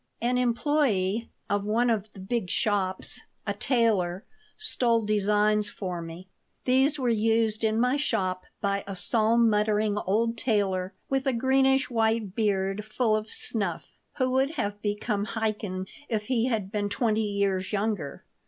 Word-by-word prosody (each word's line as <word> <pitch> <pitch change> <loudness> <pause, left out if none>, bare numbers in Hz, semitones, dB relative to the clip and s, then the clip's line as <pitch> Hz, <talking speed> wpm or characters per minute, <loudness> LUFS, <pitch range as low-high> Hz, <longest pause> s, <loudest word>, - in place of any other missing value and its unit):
An 250 +1 +1
employee 235 -5 +1 0.2
of 205 -2 0
one 230 +4 +2
of 215 -1 -2
the - - -12
big 195 0 -2
shops, 190 -2 0 0.2
a 200 - -1
tailor, 205 -6 +1 0.3
stole 235 - +1
designs 210 0 +2
for 180 -4 -5
me. 165 +3 -9 0.4
These 265 +4 +3
were 260 -3 -1
used 225 -1 +2
in 220 0 +2
my 250 +3 +2
shop 185 -10 -1 0.2
by 200 -1 0
a 195 - -5
psalm 225 +5 +3
muttering 210 -1 +1
old 230 +4 0
tailor 195 -5 0
with 270 0 -1
a 265 - +2
greenish 265 +2 +2
white 225 -3 +1
beard 200 -2 0
full 215 +1 +1
of 215 0 -2
snuff, 200 -9 -2 0.3
who 255 -1 +1
would 270 +4 +1
have 205 -5 -3
become 205 0 -1
a - - -1
Chaikin 185 -3 -5 0.2
if 220 -3 -1
he 235 +1 0
had 215 -6 -2
been 205 -1 -1
twenty 220 0 +1
years 200 -3 -1
younger. 205 -8 -2
215 Hz, 155 wpm, -27 LUFS, 200-235 Hz, 0.4 s, These